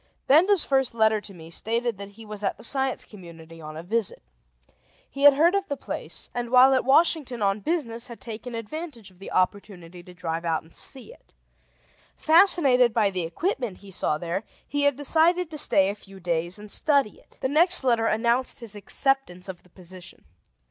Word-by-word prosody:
Benda's 340 +7 +5
first 265 -3 +1
letter 220 -1 +2
to 205 - -13
me 165 -3 -13
stated 230 +3 -2
that 200 0 -8
he 225 +2 -13
was 210 -1 -8
at 195 - -1
the - - -14
Science 265 +1 -1
Community 165 -4 -13
on 155 0 -9
a 160 - -7
visit. 215 - -2 0.8
He 280 +1 -2
had 285 -1 +9
heard 330 +5 +4
of 395 0 -1
the 285 - -4
place, - - -6
and 240 -1 -4
while 255 +2 +6
at 260 - +2
Washington 270 -4 +2
on 195 +1 +1
business 235 -5 -3
had 235 - -11
taken 235 -1 -7
advantage 230 - -7
of 180 - -24
the 195 - -9
opportunity 185 -2 -2
to 180 +1 -15
drive 165 -1 -4
out 165 -2 -1
and 160 - -20
see 275 - -3
it. - - -26 0.8
Fascinated 310 - +5
by 210 -4 +2
the 185 -1 -2
equipment 245 - -3
he 200 -1 -12
saw 155 -4 0
there, 175 +5 -4 0.2
he 285 0 -1
had 285 -2 +3
decided 325 +4 +2
to 305 - -6
stay 190 -7 +4
a 200 - -1
few 195 -2 -14
days 175 0 -1
and 210 0 -10
study 280 -6 +1
it. - - -24
The - - 0
next 340 +3 +3
letter 235 -3 +2
announced 235 +4 0
his 225 -4 -6
acceptance 205 -4 -1
of 185 -2 -8
the 180 - -25
position. 185 - -10
230 Hz, 195 wpm, -25 LUFS, 190-275 Hz, 0.8 s, had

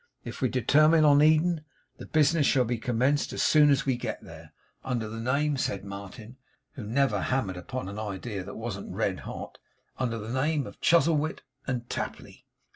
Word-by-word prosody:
If - - -8
we 130 - +2
determine 155 +6 +4
on 145 -1 +6
Eden, 155 +1 +3 0.3
the - - -10
business 155 -1 +3
shall 130 -2 +3
be 120 0 -2
commenced 125 +5 0
as - - -1
soon 150 -1 +5
as 140 -1 +2
we 130 -2 +1
get - - -5
there. - - -12 0.3
Under 120 -4 -2
the 115 +1 -6
name,' 140 +5 0
said 100 -6 -2
Martin, 100 +5 -9 0.3
who 140 -6 -8
never 135 +6 +1
hammered 125 -8 -1
upon 110 +7 -6
an 100 +2 -6
idea 100 -1 -5
that 100 - -9
wasn't 110 -4 -5
red - - -1
hot, - - -8 0.4
'under 120 -3 -1
the 110 +2 -6
name 145 +2 0
of - - -12
Chuzzlewit 160 -2 +2 0.2
and 125 -3 -3
Tapley. - - -6
130 Hz, 180 wpm, -27 LUFS, 110-150 Hz, 0.4 s, on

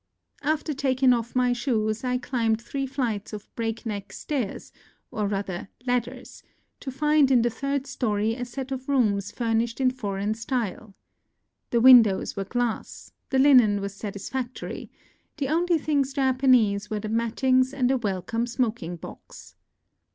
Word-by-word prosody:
After 305 +1 -1
taking 260 -2 +3
off 235 0 -3
my 250 -1 +3
shoes 230 -3 -1
I 250 0 0
climbed 230 -4 0
three 270 +3 -4
flights 235 -7 -3
of 210 -1 -9
breakneck 225 -3 -4
stairs, 260 -10 -4 0.4
or 210 -1 -1
rather 195 -2 -4 0.2
ladders, 245 0 -3 0.4
to 275 - -6
find 300 +1 +3
in 250 -3 +4
the 240 - +1
third 275 +3 -2
story 225 -5 -1
a 245 +1 -5
set 260 +2 -6
of 260 +1 -5
rooms 205 -7 +1
furnished 230 0 -1
in 255 -1 +3
foreign 205 -4 -2
style. 220 -3 -4 0.7
The 235 - +2
win 255 0 +10
dows 200 -4 -2
were 195 - -3
glass; 240 +2 -3 0.2
the 265 - +1
linen 250 -7 +6
was 200 0 -4
satisfactory; 220 +5 -6 0.5
the 275 -3 -2
only 340 +2 +2
things 285 -3 0
Japanese 255 -7 +3
were 215 -1 -2
the 215 - -5
mattings 255 +4 +2
and 260 -2 +1
a 265 - +2
welcome 225 +2 -2
smoking 230 -8 -2
box. 165 - -12
245 Hz, 150 wpm, -25 LUFS, 215-265 Hz, 0.7 s, win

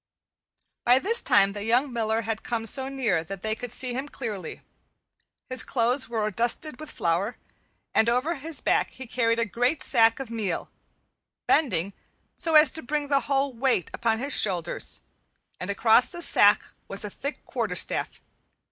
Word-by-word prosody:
By 245 +1 +5
this 440 - +2
time 200 -1 +4
the 205 0 -6
young 245 +4 +1
miller 225 -1 0
had 225 -1 -3
come 230 -2 -3
so 265 +3 -1
near 235 -12 0
that 195 +2 -8
they 220 0 -1
could 240 +1 -7
see 250 0 -2
him 265 +4 -4
clearly. 210 - -6 0.9
His 255 0 +3
clothes 245 +2 0
were 215 -2 -1
dusted 240 - 0
with 310 -1 -7
flour, 180 - -1 0.6
and 225 - +3
over 250 +8 +1
his 315 +1 -4
back - - +1
he 260 - -10
carried 230 -1 0
a 230 - +1
great 245 +8 0
sack 225 -2 +3
of 265 -4 -6
meal, 210 -7 -3 0.7
bending 200 - +1 0.4
so 325 -2 +1
as 305 0 +8
to 320 - -5
bring 290 +2 -3
the 280 -1 +4
whole 275 -1 +1
weight 240 - 0
upon 230 -1 0
his 275 +4 -2
shoulders, 180 -5 0 0.6
and 185 - -5
across 220 +4 +4
the 345 -1 -5
sack 205 -8 +4 0.2
was 200 +2 -2
a 205 - -6
thick 280 +8 -6
quarterstaff. - - -1
235 Hz, 165 wpm, -26 LUFS, 215-270 Hz, 0.9 s, as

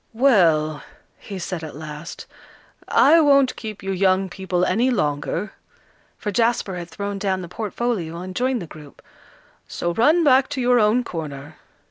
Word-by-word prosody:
"Well," 165 - +3 0.4
he 200 - -8
said 175 -2 -5
at 155 - -8
last, 150 +1 -8 0.6
"I 325 +4 +5
won't 275 -3 +4
keep 215 -3 -8
you 195 - -3
young 190 0 +1
people 185 -1 -1
any 230 +8 +1
longer," 165 - -2 0.6
for 210 - -4
Jasper 225 -2 0
had 175 -1 -7
thrown 200 +1 -5
down 190 -2 -1
the - - -7
portfolio 200 -3 -3
and 185 +1 -7
joined 250 -4 0
the - - -7
group, 150 -2 -14 0.6
"so 175 0 -3
run 305 - +3
back 270 -2 +4
to 285 -2 -4
your 245 -1 +3
own 220 +3 +3
corner. 155 - -7
195 Hz, 155 wpm, -22 LUFS, 170-240 Hz, 0.6 s, I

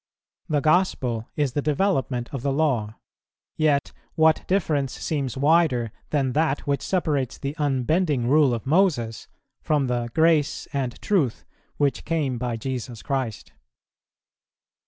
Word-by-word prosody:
The 150 -2 +1
Gospel 135 -9 +1
is 145 -4 0
the 145 - 0
development 140 -6 0
of 135 - -3
the 140 +2 0
Law; 130 -8 0 0.6
yet 150 -3 +1 0.2
what 160 0 +3
difference 155 -8 0
seems 140 -5 -3
wider 140 -6 +3 0.2
than 135 -4 0
that 150 -2 +1
which 140 -2 0
separates 150 -9 -1
the 140 +1 -4
unbending 145 -1 +1
rule 145 0 +4
of 115 - -7
Moses 140 - +1 0.3
from 150 -3 +1
the 120 -2 -1
"grace 160 -2 +2
and 130 -4 -2
truth" 160 - 0 0.3
which 145 -2 0
"came 145 -7 -1
by 120 -2 -2
Jesus 125 -1 -5
Christ?" 130 -6 -3
140 Hz, 130 wpm, -24 LUFS, 125-155 Hz, 0.6 s, rule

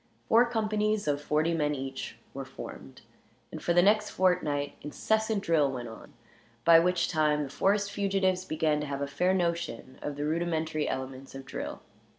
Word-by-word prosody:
Four 235 +2 +5
companies, 215 -3 0
of 145 -1 +1
forty 155 +3 +1
men, 150 -2 +1
each 135 0 -6 0.2
were - - -5
formed; 65 - -10 0.5
and - - -7
for - - 0
the 175 +1 +5
next 210 +2 +4
fortnight 150 -6 +1
incessant 220 +7 0
drill 150 -4 +3
went 120 -3 -5
on, 115 - -12 0.5
by 165 -1 +8
which 180 +1 +2
time 150 -2 +2
the 140 - -6
forest 200 +5 +1
fugitives 195 -2 +1
began 155 -3 0
to 150 - -3
have 140 0 -4
a - - -2
fair 180 +7 +1
notion 170 -8 -2
of 145 - -4
the 145 +1 -3
rudimentary 160 -1 -1
elements 130 +1 -5
of 135 0 -8
drill. - - -6
160 Hz, 170 wpm, -29 LUFS, 145-190 Hz, 0.5 s, by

